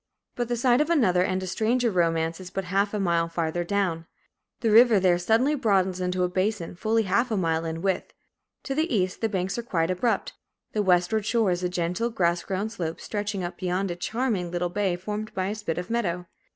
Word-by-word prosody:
But 240 -1 -2
the 240 0 -1
site 245 +2 +3
of 305 - 0
another 215 - +3
and 185 0 0
a - - -3
stranger 230 +5 +1
romance 165 -2 +1
is 185 -1 -8
but 195 - -3
half 195 +3 0
a 210 - -2
mile 170 -3 +1
farther 165 0 -1
down. 175 -3 -1 0.5
The 225 - +2
river 225 -1 +7
there 180 -2 +3
suddenly 225 +10 +2
broadens 190 -9 +1
into 180 0 0
a - - +3
basin, 185 0 -1
fully 220 +5 +1
half 220 +6 +1
a 220 - 0
mile 165 -2 0
in 165 +1 -4
width. 190 -2 -1 0.5
To 270 - -3
the 315 +4 0
east, 185 -4 0
the 225 - +1
banks 190 +2 -2
are - - -1
quite 175 -7 0
abrupt. 225 +6 0 0.4
The 215 - +1
westward 190 +3 +2
shore 225 -4 +2
is 175 0 -1
a 180 - 0
gentle, 180 +6 -1
grass 175 -6 +1
grown 200 +3 -3
slope, 165 -6 -4
stretching 205 -2 -3
up 175 - -5
beyond 185 +1 -1
a - - -3
charming 215 -1 -1
little 175 0 -1
bay 195 -1 0
formed 210 +4 -5
by 185 0 -1
a - - -1
spit 210 -7 -4
of 180 +4 -4
meadow. 180 -7 -1
190 Hz, 215 wpm, -26 LUFS, 175-220 Hz, 0.5 s, river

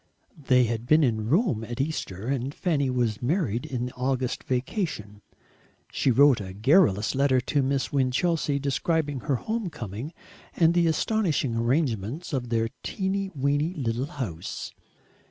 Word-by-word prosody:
They 125 -1 +5
had 115 0 -2
been 155 +2 +5
in 110 -4 0
Rome 165 - +2
at 120 +2 -6
Easter, 125 - -3
and 135 +1 -2
Fanny 145 -7 0
was 120 -4 0
married 140 - 0
in 125 -4 -3
the 125 - -6
August 130 0 -2
vacation. 125 - -3 0.7
She - - +1
wrote 135 -1 +5
a 95 -1 -7
garrulous 110 - +3
letter 135 -1 +3
to 140 +3 0
Miss 135 +1 -1
Winchelsea, 140 +3 +1
describing 145 +1 -1
her 135 +3 -1
home 220 - -3
coming, 120 - -6 0.4
and 165 -1 +4
the 175 -1 +3
astonishing 160 - 0
arrangements 120 - -1
of 125 -3 -2
their 115 -1 +1
"teeny 195 0 -2
weeny" 145 +5 0
little 125 -1 -2
house. 105 - -5
135 Hz, 145 wpm, -26 LUFS, 120-155 Hz, 0.7 s, They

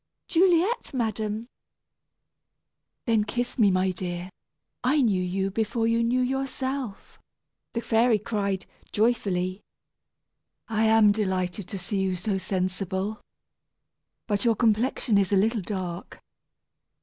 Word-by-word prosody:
"Juliet, 360 - +2
madam." 220 -2 -2 1.6
"Then, 225 -3 +3
kiss 245 +4 -3
me, 210 -3 +6
my 185 0 +2
dear; 180 0 -5 0.5
I 270 +5 +3
knew 200 -6 +2
you 190 +2 -1
before 225 +2 0
you 230 0 +2
knew 245 +2 +2
yourself," 265 -3 -3 0.5
the 230 - -1
fairy 230 0 +3
cried, 200 -2 -2 0.3
joyfully. 195 -4 0 1.1
"I 220 0 +1
am 220 -1 +6
delighted 190 -2 -1
to 195 - -5
see 190 +2 -2
you 190 -1 0
so 190 +2 -2
sensible. 190 +3 -2 1.0
But 205 -2 0
your 230 -2 +3
complexion 225 -1 +2
is 195 -1 +1
a - - +4
little 220 +3 +2
dark. 180 -2 -5
210 Hz, 115 wpm, -26 LUFS, 190-230 Hz, 1.6 s, me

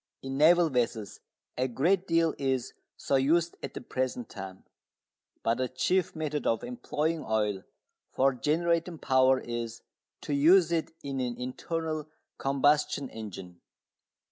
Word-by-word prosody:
In 135 0 -4
naval 165 +3 +5
vessels 115 -4 -1 0.4
a 130 - +2
great 175 +10 +1
deal 165 -1 +3
is 130 -3 -1 0.2
so 135 - +1
used 165 +5 +2
at - - -7
the - - -5
present 130 -2 -3
time. 95 -2 -8 0.8
But 115 +2 +1
the 130 - +1
chief 180 +9 0
method 150 -2 -2
of 115 - +1
employing 165 -10 -2
oil 105 -3 0 0.5
for 135 +1 +3
generating 165 +5 0
power 130 -2 +3
is 120 -1 -5 0.4
to 145 - -3
use 165 +4 +5
it 165 -2 0
in 135 -1 -3
an 125 -2 -2
internal 155 +4 -4 0.3
combustion 140 0 +2
engine. 95 -5 -9
135 Hz, 135 wpm, -29 LUFS, 125-160 Hz, 0.8 s, naval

